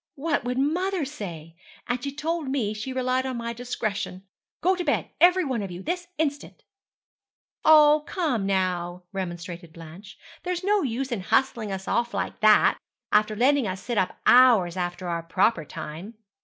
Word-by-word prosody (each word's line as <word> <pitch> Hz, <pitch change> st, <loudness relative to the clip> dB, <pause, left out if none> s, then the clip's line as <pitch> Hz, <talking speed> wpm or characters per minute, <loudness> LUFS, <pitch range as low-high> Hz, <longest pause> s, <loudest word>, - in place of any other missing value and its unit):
'What 300 Hz, +1 st, -1 dB
would 250 Hz, +1 st, -2 dB
mother 345 Hz, +5 st, 0 dB
say? 170 Hz, -, -8 dB, 0.3 s
And 245 Hz, 0 st, -2 dB
she 280 Hz, -, -3 dB
told 315 Hz, +2 st, -3 dB
me 240 Hz, -6 st, -1 dB
she 215 Hz, +5 st, -5 dB
relied 255 Hz, 0 st, 0 dB
on 255 Hz, -2 st, -3 dB
my 235 Hz, 0 st, -4 dB
discretion! 215 Hz, -6 st, -4 dB, 0.4 s
Go 370 Hz, +2 st, +3 dB
to 360 Hz, -, -3 dB
bed, 290 Hz, -4 st, -1 dB
every 360 Hz, +1 st, +5 dB
one 255 Hz, -5 st, -2 dB
of 195 Hz, -, -5 dB
you, 180 Hz, +1 st, -8 dB
this 355 Hz, +1 st, -3 dB
instant!' 290 Hz, -2 st, -3 dB, 1.0 s
'Oh, 305 Hz, -1 st, +6 dB
come, 270 Hz, -, -1 dB
now,' 180 Hz, -2 st, -1 dB
remonstrated 175 Hz, -2 st, -6 dB
Blanche, 170 Hz, +5 st, -12 dB, 0.2 s
'there's 360 Hz, 0 st, -3 dB
no 410 Hz, +1 st, +2 dB
use 265 Hz, -1 st, -3 dB
in 225 Hz, -5 st, -2 dB
hustling 225 Hz, +1 st, 0 dB
us 190 Hz, 0 st, -5 dB
off 235 Hz, 0 st, 0 dB
like -, -, -3 dB
that, 215 Hz, -1 st, +5 dB, 0.3 s
after 215 Hz, 0 st, +3 dB
letting 260 Hz, +1 st, +3 dB
us 185 Hz, 0 st, -4 dB
sit 235 Hz, -4 st, -1 dB
up 185 Hz, -, -1 dB
hours 235 Hz, -9 st, +6 dB
after 175 Hz, 0 st, -3 dB
our 170 Hz, -1 st, -2 dB
proper 170 Hz, +2 st, +1 dB
time. 165 Hz, +9 st, -8 dB
235 Hz, 170 wpm, -25 LUFS, 185-285 Hz, 1.0 s, Oh